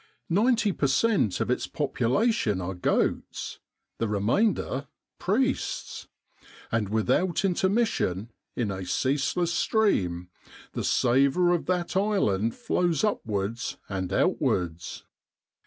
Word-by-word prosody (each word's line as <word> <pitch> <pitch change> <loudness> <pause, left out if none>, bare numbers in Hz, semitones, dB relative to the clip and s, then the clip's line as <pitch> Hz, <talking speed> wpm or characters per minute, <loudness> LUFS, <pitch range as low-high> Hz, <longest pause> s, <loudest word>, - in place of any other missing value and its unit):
Ninety 220 +3 +3
per 145 - 0
cent, 135 - +2
of - - 0
its - - -1
population 125 - +1
are 95 +1 -3
goats, 90 - -1 0.4
the 115 - 0
re 105 -1 -1
mainder 140 - +1 0.3
priests; - - -1 0.6
and 110 -3 0
without 130 - +1
intermission, 185 - 0 0.2
in 110 -5 -1
a 95 -1 -4
ceaseless 145 - 0
stream, 90 - +1 0.5
the - - -3
savour 140 +8 +3
of 175 - -1
that 180 0 -1
island 115 - +1
flows 175 -4 0
upwards 115 - -2
and 95 -2 -3
outwards. 85 -2 0
135 Hz, 105 wpm, -27 LUFS, -, 0.6 s, Ninety